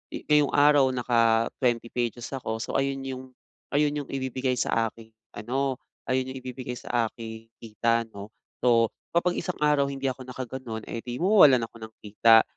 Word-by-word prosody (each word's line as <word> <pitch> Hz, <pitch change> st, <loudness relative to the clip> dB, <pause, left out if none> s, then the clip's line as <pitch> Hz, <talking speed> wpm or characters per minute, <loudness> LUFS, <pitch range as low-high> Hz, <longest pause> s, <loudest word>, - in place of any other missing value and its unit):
eh, -, -, -6 dB
ngayong 150 Hz, -1 st, +5 dB
araw, 145 Hz, -2 st, +6 dB
naka-twenty 115 Hz, 0 st, +1 dB
pages 120 Hz, -1 st, -3 dB
ako, 115 Hz, -4 st, -3 dB
so, -, -, -5 dB
ayun 135 Hz, 0 st, -1 dB
'yong 130 Hz, -1 st, -6 dB, 0.5 s
ayun 145 Hz, 0 st, +3 dB
'yong 145 Hz, -, -6 dB
ibibigay 130 Hz, -1 st, -2 dB
sa 115 Hz, -1 st, +1 dB
aking 115 Hz, 0 st, -13 dB, 0.2 s
ano, 130 Hz, +5 st, -1 dB, 0.3 s
ayun 130 Hz, 0 st, 0 dB
'yong 130 Hz, 0 st, -6 dB
ibibigay 125 Hz, -1 st, -6 dB
sa 120 Hz, -1 st, 0 dB
aking 110 Hz, -1 st, -9 dB
kita, 115 Hz, +1 st, 0 dB
'no? 100 Hz, 0 st, -9 dB, 0.3 s
So, 115 Hz, -2 st, +4 dB, 0.2 s
kapag 175 Hz, +1 st, +2 dB
isang 180 Hz, -, -3 dB
araw 145 Hz, -2 st, +3 dB
hindi 135 Hz, 0 st, -5 dB
ako 130 Hz, 0 st, -10 dB
nakaganun, 125 Hz, -3 st, -6 dB
eh, 115 Hz, -, -5 dB
'di 120 Hz, 0 st, -6 dB
mawawalan 160 Hz, -, +6 dB
ako 115 Hz, -, -18 dB
ng 110 Hz, -, -28 dB
kita. 110 Hz, +2 st, +5 dB
125 Hz, 165 wpm, -26 LUFS, 115-135 Hz, 0.5 s, araw